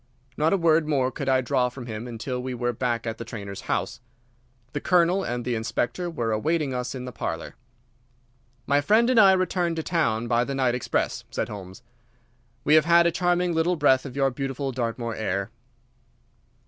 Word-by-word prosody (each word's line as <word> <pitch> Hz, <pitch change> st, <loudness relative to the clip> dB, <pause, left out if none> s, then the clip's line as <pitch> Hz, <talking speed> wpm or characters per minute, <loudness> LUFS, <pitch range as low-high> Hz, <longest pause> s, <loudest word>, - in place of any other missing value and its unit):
Not 155 Hz, +2 st, +2 dB
a 195 Hz, -, +3 dB
word 165 Hz, -2 st, +3 dB
more 135 Hz, -4 st, +1 dB
could 135 Hz, +1 st, -3 dB
I 130 Hz, 0 st, +3 dB
draw 125 Hz, 0 st, +1 dB
from 125 Hz, 0 st, -9 dB
him 115 Hz, 0 st, -6 dB
until 125 Hz, +2 st, -4 dB
we 130 Hz, 0 st, -4 dB
were 120 Hz, 0 st, -1 dB
back 120 Hz, 0 st, -2 dB
at 115 Hz, -1 st, -4 dB
the -, -, -4 dB
trainer's 100 Hz, -4 st, -7 dB
house. -, -, -1 dB, 0.7 s
The 145 Hz, -, -3 dB
Colonel 180 Hz, +2 st, +3 dB
and 120 Hz, -5 st, -3 dB
the 125 Hz, -, -1 dB
Inspector 120 Hz, +9 st, -2 dB
were 120 Hz, -9 st, -2 dB
awaiting 150 Hz, +5 st, 0 dB
us 125 Hz, +1 st, -3 dB
in 125 Hz, -1 st, -6 dB
the 125 Hz, -, -6 dB
parlour. 80 Hz, -7 st, -5 dB, 1.1 s
"My 145 Hz, +1 st, +3 dB
friend 225 Hz, -, +4 dB
and 245 Hz, -, +5 dB
I 195 Hz, -3 st, +8 dB
return 180 Hz, -2 st, 0 dB
to 160 Hz, -, -3 dB
town 120 Hz, -11 st, 0 dB
by 120 Hz, 0 st, +2 dB
the 140 Hz, +2 st, -4 dB
night 130 Hz, -3 st, +2 dB
express," 125 Hz, -, -1 dB
said -, -, -3 dB
Holmes. 100 Hz, +2 st, -9 dB, 0.8 s
"We 150 Hz, -, +3 dB
have 155 Hz, -1 st, +6 dB
had 170 Hz, 0 st, +5 dB
a 170 Hz, -, +3 dB
charming 175 Hz, 0 st, +1 dB
little 165 Hz, +2 st, +1 dB
breath 135 Hz, -4 st, +3 dB
of 135 Hz, -3 st, -8 dB
your 135 Hz, -1 st, +2 dB
beautiful 135 Hz, +1 st, -3 dB
Dartmoor 115 Hz, -1 st, -3 dB
air." 100 Hz, -1 st, -2 dB
130 Hz, 190 wpm, -25 LUFS, 120-165 Hz, 1.1 s, I